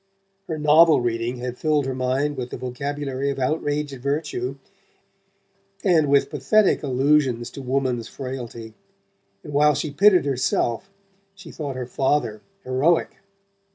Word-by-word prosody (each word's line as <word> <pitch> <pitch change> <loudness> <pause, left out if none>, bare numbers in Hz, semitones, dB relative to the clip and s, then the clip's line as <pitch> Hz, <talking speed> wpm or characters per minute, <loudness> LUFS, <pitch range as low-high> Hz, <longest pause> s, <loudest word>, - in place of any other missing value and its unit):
Her 160 - -3
novel 155 +2 +5
reading 120 0 -2
had 125 0 -6
filled 150 -3 +1
her 135 - -2
mind 130 +3 -1
with 125 -2 -5
the - - -6
vocabulary 135 +2 -3
of 140 - -3
outraged 145 0 -2
virtue, 140 -2 -2 1.3
and 165 -7 +3
with 140 0 +3
pathetic 155 +9 +2
allusions 130 -3 +1
to 140 - -8
woman's 130 -3 -1
frailty, 120 -4 -7 0.7
and 145 - -9
while 150 +1 +4
she 150 - -3
pitied 180 +3 +4
herself 130 +2 -1 0.5
she 195 -4 -12
thought 145 -4 -5
her 130 -1 -4
father 125 -4 -1 0.2
heroic. 135 +7 +1
140 Hz, 130 wpm, -23 LUFS, 125-150 Hz, 1.3 s, novel